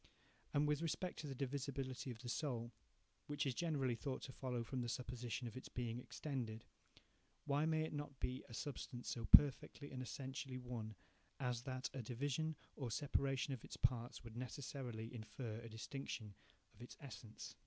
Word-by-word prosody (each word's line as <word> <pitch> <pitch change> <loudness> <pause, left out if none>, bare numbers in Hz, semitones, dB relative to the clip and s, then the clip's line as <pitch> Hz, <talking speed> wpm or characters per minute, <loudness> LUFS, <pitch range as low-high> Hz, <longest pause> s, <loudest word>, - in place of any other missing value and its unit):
And 145 +1 +4
with 150 +1 +3
respect 175 +2 0
to 150 - -3
the 135 - -3
divisibility 135 -1 -1
of 120 - -3
the 120 +2 -7
soul, 120 -3 0 0.6
which 145 0 +1
is 135 - +2
generally 140 -5 +2
thought 130 +2 -2
to 130 - -4
follow 125 -2 -1
from 125 +2 -1
the 120 - 0
supposition 120 0 -2
of 115 - -6
its 130 - -6
being 120 -1 -1
extended, 125 -5 -3 0.8
why 145 +2 +4
may 160 -1 +4
it 160 - -2
not 145 -2 -3
be 130 +1 0
a - - -8
substance 125 -1 -3
so 115 -2 -1
perfectly 145 +2 +8
and 130 -1 -3
essentially 130 0 -3
one, 120 -4 -4 0.4
as 125 -3 +1
that 130 -1 -1
a 135 - -2
division 140 +7 0 0.2
or 130 -4 -2
separation 135 +2 +2
of 125 - -5
its - - -6
parts 120 -2 +2
would 115 -1 -8
necessarily 125 -2 -3
infer 115 0 -4
a 115 0 -7
distinction 110 -2 -4 0.4
of - - -17
its 120 - -8
essence? 115 -6 -7
130 Hz, 175 wpm, -43 LUFS, 120-140 Hz, 0.8 s, perfectly